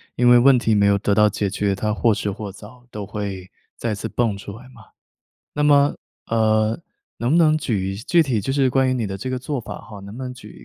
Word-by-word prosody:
因 125 0 +2
为 120 0 +7
问 135 +1 +6
题 115 -2 +1
没 100 -1 +3
有 100 0 +4
得 100 0 0
到 105 0 +4
解 100 -1 -2
决， 100 -1 0
它 105 +1 -1
或 115 0 +2
迟 100 -1 -2
或 100 0 -6
早 110 +5 -14
都 105 -3 -6
会 100 -2 -5 0.3
再 115 -2 -2
次 100 - -5
蹦 115 -4 0
出 100 +1 -9
来 130 +1 -14
嘛。 120 -3 -16 0.7
那 150 - -2
么， 145 -1 +4 0.3
呃 110 0 +1 0.4
能 120 +3 0
不 - - +4
能 155 -2 +4
举 100 -9 -2
一 95 - -5
具 165 +10 +2
体 125 -8 -1
就 135 - -2
是 135 -2 +2
关 130 0 +2
于 130 - +1
你 120 -3 -1
的 95 0 -5
这 130 - -5
个 130 - -2
做 135 +1 -4
法 110 - -8
哈， 105 -2 -11
能 100 +3 -10
不 130 - -7
能 125 -1 -5
举 125 - -13
110 Hz, 270 characters per minute, -21 LUFS, 100-130 Hz, 0.7 s, 为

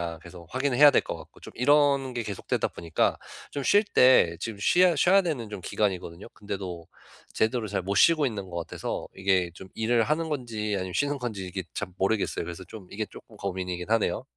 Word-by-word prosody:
거냐." - - -15
계속 85 0 -12
확인을 130 -1 0
해야 145 +1 +9
될 - - +4
것 - - -5
같고 - - -15
좀 - - -10
이런 140 0 +3
게 120 - -2
계속되다 100 -3 -2
보니까 85 -1 0 0.3
좀 140 - -4
쉴 205 +9 +4
때 125 - +5
지금 105 0 -5
쉬야 175 - +4
쉬어야 190 +6 +5
되는 130 -10 -3
좀 105 -2 -6
기간이거든요. 90 -2 -2
근데도 95 -5 -6 0.5
제대로 110 0 0
잘 100 -1 -2
못 100 +2 -2
쉬고 160 -3 +5
있는 100 -5 -5
것 85 - -6
같아서 85 - -4
이게 95 -2 +1
좀 95 0 -11
일을 115 +1 +2
하는 160 +4 -1
건지 115 -7 -3
아니면 95 -1 -4
쉬는 145 0 0
건지 110 -7 -4
이게 95 +1 -5
참 95 -3 -5
모르겠어요. 95 -3 0
그래서 85 +2 -7
좀 95 0 -11
이게 110 +2 -3
쪼끔 - - -15
고민이긴 90 -1 -4
하네요. 110 -1 +1
105 Hz, 410 characters per minute, -27 LUFS, 95-130 Hz, 0.5 s, 해야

